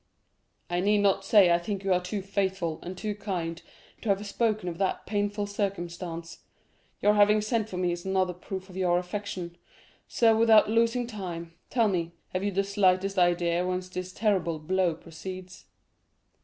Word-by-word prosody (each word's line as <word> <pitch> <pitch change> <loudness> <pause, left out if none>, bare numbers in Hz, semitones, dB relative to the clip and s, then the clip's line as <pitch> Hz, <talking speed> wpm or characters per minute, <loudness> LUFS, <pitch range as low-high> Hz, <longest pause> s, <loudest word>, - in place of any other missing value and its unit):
"I 175 0 -1
need 205 +3 +3
not 195 -1 +2
say 195 -3 +6
I 170 - +3
think 195 +2 -4
you 195 -1 +2
are 180 - +2
too 190 +2 -4
faithful 190 -4 -1
and 180 +1 -7
too 210 +2 -2
kind 180 -5 -4 0.4
to 225 - -3
have 200 +1 +1
spoken 215 -1 0
of 170 -1 -4
that 190 -1 -1
painful 205 0 -1
circumstance. 175 -4 -4 0.6
Your 210 - +5
having 210 0 +5
sent 215 0 -1
for 185 - -5
me 180 -1 +1
is 175 0 -4
another 190 -1 +1
proof 190 +2 -7
of 185 - -13
your 180 -2 +2
affection. 180 -2 -5 0.5
So, 225 -2 +4
without 220 -1 +5
losing 230 +2 +2
time, 175 -7 -6 0.2
tell 230 -3 +3
me, 170 -4 -1 0.2
have 185 +1 -3
you 205 - +1
the 195 0 0
slightest 195 -1 +2
idea 175 0 +2
whence 185 0 -2
this 185 0 -5
terrible 185 -6 0
blow 175 +2 0
proceeds?" 185 +3 -9
190 Hz, 170 wpm, -28 LUFS, 175-205 Hz, 0.6 s, say